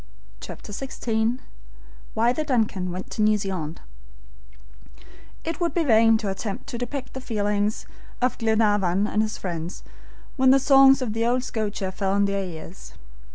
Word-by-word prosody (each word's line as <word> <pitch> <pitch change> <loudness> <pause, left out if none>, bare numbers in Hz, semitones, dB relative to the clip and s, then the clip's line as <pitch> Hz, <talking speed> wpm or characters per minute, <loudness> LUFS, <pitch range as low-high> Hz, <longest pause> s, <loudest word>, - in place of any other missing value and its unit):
CHAPTER - - -9
XVI 230 0 -1 0.8
WHY 235 +2 +3
THE 310 - -2
"DUNCAN" 220 -10 0
WENT 185 +1 -6
TO - - -2
NEW 215 0 +4
ZEALAND 185 -6 -4 1.6
IT 330 +2 -4
would 340 - 0
be 340 - +2
vain 225 -4 +5
to 215 -2 -3
attempt 195 +1 -5
to 235 - -5
depict 255 +2 -5
the 265 - -6
feelings 210 -3 -1 0.3
of 250 0 +1
Glenarvan 210 -4 +2
and 215 0 +1
his 215 -1 -2
friends 170 -2 -5 0.5
when 260 -1 +5
the 270 - +7
songs 270 0 +6
of 220 -3 -3
old 240 +2 +1
Scotia 210 -5 -3
fell 190 0 -1
on 200 0 +3
their 200 0 -1
ears. 175 0 -9
220 Hz, 155 wpm, -24 LUFS, 195-250 Hz, 1.6 s, the